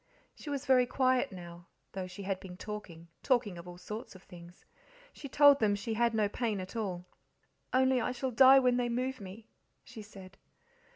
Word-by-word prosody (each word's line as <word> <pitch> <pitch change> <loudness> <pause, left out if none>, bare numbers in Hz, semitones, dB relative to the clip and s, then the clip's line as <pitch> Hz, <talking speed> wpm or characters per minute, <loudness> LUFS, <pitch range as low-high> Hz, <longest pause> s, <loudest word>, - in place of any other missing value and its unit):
She 300 - -10
was 285 -1 -4
very 255 -2 +4
quiet 255 +1 +1
now, 175 -1 -11 0.2
though 190 -1 -5
she 185 +2 -9
had 190 -1 -2
been 180 -2 -11
talking 180 -6 -8
talking 230 -9 0
of 170 - -11
all 175 0 -10
sorts 210 +4 -8
of 185 - -15
things. 175 -1 -15 0.5
She 280 - -9
told 285 0 +6
them 210 -2 +2
she 220 +3 -4
had 235 +1 +1
no 215 -2 +2
pain 215 -1 -2
at 185 +4 -8
all. 185 -6 -4 0.7
"Only 260 -1 +3
I - - -1
shall 255 +1 -3
die 265 +3 +7
when 250 -2 +3
they 245 -1 0
move 255 +1 -3
me," 200 +3 -10 0.4
she 255 -4 -11
said. 195 -2 -14
220 Hz, 190 wpm, -31 LUFS, 185-255 Hz, 0.7 s, die